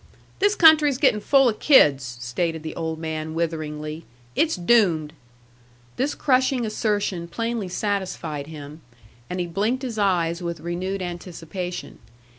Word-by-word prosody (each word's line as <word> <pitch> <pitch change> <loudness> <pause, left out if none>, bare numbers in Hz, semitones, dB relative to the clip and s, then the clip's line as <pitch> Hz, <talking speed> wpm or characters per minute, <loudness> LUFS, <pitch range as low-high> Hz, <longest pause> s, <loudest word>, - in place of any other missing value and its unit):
"This 405 +1 +3
country's 305 -5 +6
getting 265 -6 +3
full 270 +2 +4
of 220 -3 -1
kids," 140 - +4
stated 160 +6 -2
the 155 - -6
old 160 -1 -3
man, 160 0 -4
witheringly. 155 -1 -3 0.3
"It's 320 0 +2
doomed." 175 -6 +2 0.8
This 275 +3 -1
crushing 255 -2 +2
assertion 205 -5 -1
plainly 230 +2 -3
satisfied 180 -7 -3
him. 150 0 -10 0.5
And 180 +1 -3
he 175 - 0
blinked 215 +10 -1
his 235 -4 -4
eyes 175 -4 +1
with 170 -2 -4
renewed 185 +4 -3
anticipation. 175 0 -6
175 Hz, 130 wpm, -23 LUFS, 160-230 Hz, 0.8 s, country's